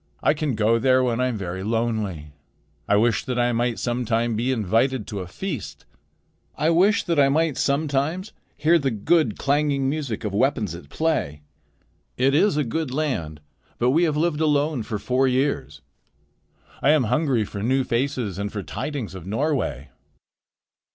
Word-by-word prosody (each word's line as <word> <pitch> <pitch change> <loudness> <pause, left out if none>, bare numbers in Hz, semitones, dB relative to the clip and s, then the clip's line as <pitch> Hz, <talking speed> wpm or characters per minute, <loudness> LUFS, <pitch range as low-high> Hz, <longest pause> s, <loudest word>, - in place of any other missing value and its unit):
I - - +4
can 150 -4 -2
go 110 +2 +2
there 130 +1 +3
when 120 -1 0
I 130 - +2
am 120 -3 -2
very 95 -1 -5
lonely.' 105 -8 -2 0.6
I 100 - +3
wish 115 +2 +2
that 125 -1 -2
I 120 0 +2
might 120 0 0
sometime 120 -1 -1
be 120 +4 0
invited 115 +2 +1
to 100 - -5
a 90 - -6
feast. 90 - -6 0.7
I 160 +2 +2
wish 190 +5 +3
that 170 -3 0
I 135 -1 +5
might 155 0 +1
sometimes 150 +6 -1 0.2
hear 165 +3 +4
the 140 -3 0
good, 120 +2 +1
clanging 140 -1 +1
music 140 -6 -3
of 105 -2 -3
weapons 105 - +1
at 85 -4 -10
play. 75 - -1 0.7
It 135 +2 +3
is 155 +1 +3
a 150 - +2
good 140 +3 -3
land, 105 - -2 0.4
but 125 +1 +2
we 165 +5 +3
have 155 -2 0
lived 160 -1 0
alone 150 -3 +1
for 105 0 -4
four 130 +5 +1
years. 130 - -1 1.0
I 135 - +3
am 150 -3 +5
hungry 125 -1 +1
for 100 0 -7
new 130 +5 +1
faces 120 -6 -2
and 100 0 -3
for 100 -2 -5
tidings 135 - -5
of 95 -2 -9
Norway." 110 - -1
125 Hz, 170 wpm, -23 LUFS, 105-150 Hz, 1.0 s, I